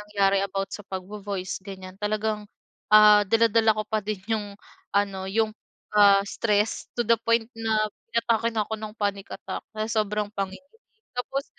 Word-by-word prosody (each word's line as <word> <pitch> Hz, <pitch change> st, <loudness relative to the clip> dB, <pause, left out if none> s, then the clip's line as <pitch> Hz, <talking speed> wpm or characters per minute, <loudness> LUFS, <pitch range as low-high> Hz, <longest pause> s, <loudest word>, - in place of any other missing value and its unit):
nangyari 200 Hz, -1 st, +2 dB
about 195 Hz, 0 st, -3 dB
sa -, -, -5 dB
pagvo-voice 195 Hz, 0 st, -5 dB
ganiyan, 190 Hz, 0 st, -10 dB
talagang, 210 Hz, 0 st, -1 dB, 0.4 s
ah, 210 Hz, 0 st, +8 dB
dala-dala 225 Hz, -1 st, +4 dB
ko 215 Hz, -, -2 dB
pa 215 Hz, +1 st, -1 dB
din 210 Hz, -1 st, -4 dB
yung 205 Hz, -2 st, -3 dB, 0.4 s
ano, 195 Hz, -2 st, 0 dB
yung, 220 Hz, +2 st, +1 dB, 0.4 s
ah, 200 Hz, -1 st, +6 dB
stress, 210 Hz, +1 st, 0 dB
to 240 Hz, -, +1 dB
the 230 Hz, 0 st, +3 dB
point 230 Hz, +1 st, +1 dB
na 220 Hz, -2 st, 0 dB, 0.3 s
inatake 230 Hz, 0 st, +2 dB
na 225 Hz, -2 st, -1 dB
ako 220 Hz, +1 st, -5 dB
ng 215 Hz, 0 st, -7 dB
panic 200 Hz, -2 st, -2 dB
attack, -, -, -6 dB, 0.2 s
sa 220 Hz, 0 st, 0 dB
sobrang 210 Hz, 0 st, -2 dB
pangi 195 Hz, -2 st, -3 dB, 0.6 s
tapos, 270 Hz, +3 st, -3 dB
210 Hz, 155 wpm, -26 LUFS, 200-220 Hz, 0.6 s, ah